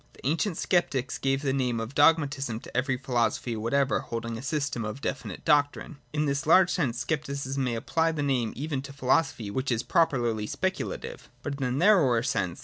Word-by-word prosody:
The - - -16
ancient 165 +5 0
Sceptics 140 -8 0
gave 135 +1 0
the 135 -2 +1
name 125 -4 0
of 115 +3 -5
Dogmatism 140 -6 +2
to - - -13
every 130 +1 +1
philosophy 120 -2 -1
whatever 130 +5 +1
holding 115 0 -5
a 115 - -6
system 140 -3 -2
of 105 +5 -5
definite - - -5
doctrine. 145 -1 +1
In 150 0 0
this 140 0 -1
large 185 +2 +6
sense 120 -8 -1
Scepticism 140 -3 -2
may 125 -2 -1
apply 160 +8 0
the 150 -2 -2
name 125 -5 0
even 140 0 -3
to 140 0 -9
philosophy 130 -5 0
which 130 +5 -2
is 115 0 0
properly 120 -10 +1
Specu - - -1
lative. - - -9 0.2
But 145 - -3
in - - +1
the 125 - 0
narrower 140 - +4
sense. 115 -9 -1
135 Hz, 190 wpm, -27 LUFS, 120-145 Hz, 0.2 s, large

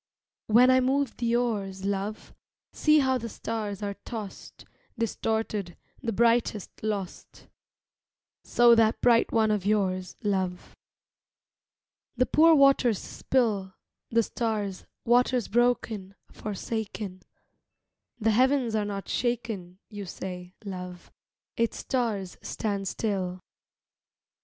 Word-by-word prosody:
When 245 +4 +6
I 255 - +5
move 265 0 +1
the 235 -1 +1
oars, 200 -6 -1
love, 200 +2 -3 0.4
See 305 -1 +4
how 260 -1 +2
the 230 0 -5
stars 210 -3 -4
are 200 0 -2
tossed, 215 -4 -8 0.3
Distorted, 220 -5 -2 0.2
the 235 -4 -2
brightest 230 -2 +2
lost. 205 -4 -5 1.0
So 240 0 +5
that 225 -1 +4
bright 235 -2 +4
one 220 -1 +3
of 210 -3 0
yours, 185 -3 0
love. 190 -3 -2 1.4
The 255 - +4
poor 325 +4 +6
waters 275 -6 +5
spill 205 -8 -1 0.3
The 230 0 +3
stars, 210 -5 -3 0.2
waters 245 0 +3
broken, 225 -4 0 0.2
forsaken. 210 -2 -5 1.0
The 225 0 +2
heavens 255 +1 +3
are 215 -1 +1
not 200 -1 -5
shaken, 225 -7 -2
you 205 -3 -7
say, 180 0 -7
love, 180 -2 -7 0.5
Its 230 0 0
stars 215 -8 -2
stand 200 -2 -3
still. 185 -3 -2
215 Hz, 110 wpm, -27 LUFS, 195-240 Hz, 1.4 s, When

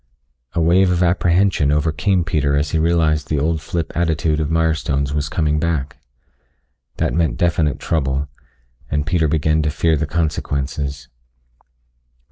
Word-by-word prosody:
A - - -1
wave 90 +3 +4
of 90 0 +1
apprehension 90 -3 +2
overcame 80 +5 +1
Peter 75 -4 0
as 75 0 0
he 80 - +1
realized 80 -3 +1
the 75 - -1
old 80 +2 0
flip 80 +1 -3
attitude 80 -2 0
of 75 -2 -1
Mirestone's 75 -4 0
was 75 -1 -1
coming 75 -2 0
back. 75 -4 -2 1.0
That - - 0
meant 85 -1 0
definite 80 -4 +1
trouble, 70 -2 -1 0.6
and 75 0 -1
Peter 80 -1 +1
began 80 +1 +1
to 75 - 0
fear 80 +2 +1
the 80 0 -2
consequences. 70 -3 -2
80 Hz, 140 wpm, -19 LUFS, 75-85 Hz, 1.0 s, wave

